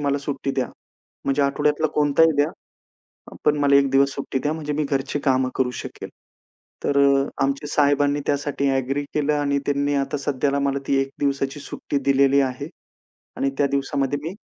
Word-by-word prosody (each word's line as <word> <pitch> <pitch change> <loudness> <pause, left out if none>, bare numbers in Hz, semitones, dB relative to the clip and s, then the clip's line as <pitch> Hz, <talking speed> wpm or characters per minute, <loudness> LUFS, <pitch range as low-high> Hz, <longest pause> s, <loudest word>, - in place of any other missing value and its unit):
मला 140 -1 0
सुट्टी 140 0 -3
द्या. 130 -3 -1 0.6
म्हणजे 140 +1 +1
आठवड्यातला 150 +3 +1
कोणताही 150 +2 +4
द्या. 145 +2 +2 0.9
पण 150 0 +3
मला 140 -1 +4
एक 140 -1 +3
दिवस 140 +1 +4
सुट्टी 135 -1 -3
द्या 150 +3 -1
म्हणजे 150 -2 -4
मी 150 +1 -1
घरची 140 0 -1
कामं 130 -1 +2
करू 130 -1 +1
शकेल. - - -8 0.8
तर 140 - +1 0.5
आमचे 140 +2 -1
साहेबांनी 145 0 +2
त्यासाठी 140 -1 0
अग्री 135 +2 0
केलं 150 0 +1
आणि 140 -1 +1
त्यांनी 145 0 0
आता 140 +1 -1
सध्याला 140 0 0
मला 140 0 0
ती 140 - +3
एक 135 0 -2
दिवसाची 140 0 -1
सुट्टी 140 0 -4
दिलेली 140 0 +4
आहे 130 -2 -2 0.7
आणि 135 - 0
त्या 145 - +3
दिवसामध्ये 140 0 -1
मी 165 +4 -4
140 Hz, 165 wpm, -23 LUFS, 135-145 Hz, 0.9 s, कोणताही